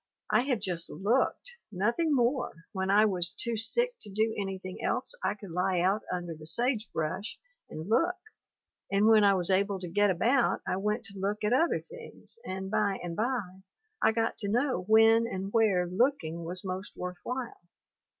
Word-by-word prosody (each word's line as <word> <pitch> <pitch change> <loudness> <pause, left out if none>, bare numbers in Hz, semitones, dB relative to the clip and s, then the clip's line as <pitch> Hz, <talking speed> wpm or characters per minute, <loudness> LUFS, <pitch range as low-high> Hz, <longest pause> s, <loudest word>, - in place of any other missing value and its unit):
I - - +5
have 255 -5 0
just 180 -4 -1
looked, 245 - 0 0.2
nothing 235 - +1
more, 245 - 0
when 190 -2 -2
I 210 +2 +6
was 180 -4 0
too 235 -1 -3
sick 475 - +1
to - - -7
do 220 +3 0
any 195 -2 -3
thing 185 0 -8
else - - 0
I 205 - 0
could 200 -3 -11
lie 180 +1 +1
out 190 +4 +2
under 175 -2 -3
the 155 -1 -11
sage 235 - +1
brush 185 +6 -3 0.3
and 155 +3 -7
look, 335 - +2 0.8
and 200 +1 +3
when 220 -1 +6
I 200 -1 +5
was 180 0 +1
able 195 +1 +1
to 180 - -5
get 205 +4 +2
about 235 +8 +2
I - - 0
went 210 +3 -1
to 200 -2 -7
look 205 +2 -2
at 210 +3 +2
other 325 +7 +2
things, 470 0 -10
and 190 +1 -5
by 200 -3 +1
and 170 -1 -4
by 210 -5 -2 0.4
I 220 - +5
got 225 0 -1
to 200 - -3
know 240 -4 0
when 225 +1 +6
and 195 -2 -5
where 210 -6 +3
looking 175 - 0
was 180 +3 -5
most 185 +1 -5
worth 180 0 -5
while. 250 -1 -5
205 Hz, 190 wpm, -29 LUFS, 185-230 Hz, 0.8 s, I